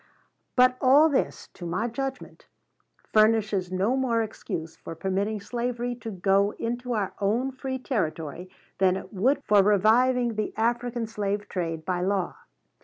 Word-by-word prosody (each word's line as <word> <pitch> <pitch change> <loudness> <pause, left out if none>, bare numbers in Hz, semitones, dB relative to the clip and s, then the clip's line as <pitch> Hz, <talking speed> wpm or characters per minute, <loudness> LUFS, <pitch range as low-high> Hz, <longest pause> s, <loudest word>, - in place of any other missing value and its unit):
"But 255 0 +5
all 280 +5 +6
this, 275 - -1
to - - -11
my 180 +7 -1
judgment, 265 +3 -6 0.7
furnishes 215 -4 +3
no 195 +7 +1
more 240 -4 +1
excuse 165 -6 -6
for 165 - -9
permitting 195 +5 -1
slavery 245 +2 -3
to 230 -2 -7
go 195 +1 +2
into 240 +2 -3
our 205 -4 -1
own 230 +7 +1
free 260 0 -4
territory 180 - -3 0.3
than 190 -1 +3
it - - -9
would 265 +9 +1
for 205 -1 +5
reviving 230 +5 +3
the 215 - -2
African 240 +1 0
slave 205 -1 -3
trade 165 -4 -3
by 180 -1 -1
law. 190 0 0
215 Hz, 145 wpm, -26 LUFS, 190-245 Hz, 0.7 s, all